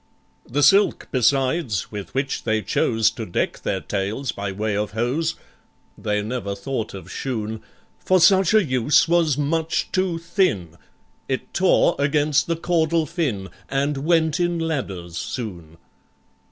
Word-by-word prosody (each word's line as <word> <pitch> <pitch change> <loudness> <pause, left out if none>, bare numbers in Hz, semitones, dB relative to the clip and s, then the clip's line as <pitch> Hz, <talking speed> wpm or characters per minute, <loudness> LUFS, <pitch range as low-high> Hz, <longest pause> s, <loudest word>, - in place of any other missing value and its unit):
The 145 +4 +1
silk, 195 +8 +4
besides, 130 - +1
with 100 -4 -6
which 135 0 -1
they 110 -1 0
chose 115 -1 +2
To 115 - -6
deck 90 - -2
their - - -2
tails 105 +7 -2
by 100 -1 -4
way 105 +2 -2
of 105 0 -2
hose 125 +9 0 0.6
(They 105 0 -1
never 110 -3 -3
thought 110 +1 -4
of 95 - -10
shoon), 110 -4 -4 0.4
For 185 0 +3
such 190 +3 +5
a 215 - +6
use 130 +3 +3
was 165 -4 +2
much 160 +3 -1
too 185 -2 0
thin,— 165 - 0 0.5
It - - -3
tore - - +3
against 145 +1 +2
the 170 - 0
caudal 165 -1 +1
fin, 135 - -2 0.2
And 140 +1 0
"went 160 +2 +2
in 175 -1 +1
ladders" 100 - -3
soon. 85 -11 -6
135 Hz, 140 wpm, -22 LUFS, 105-165 Hz, 0.6 s, a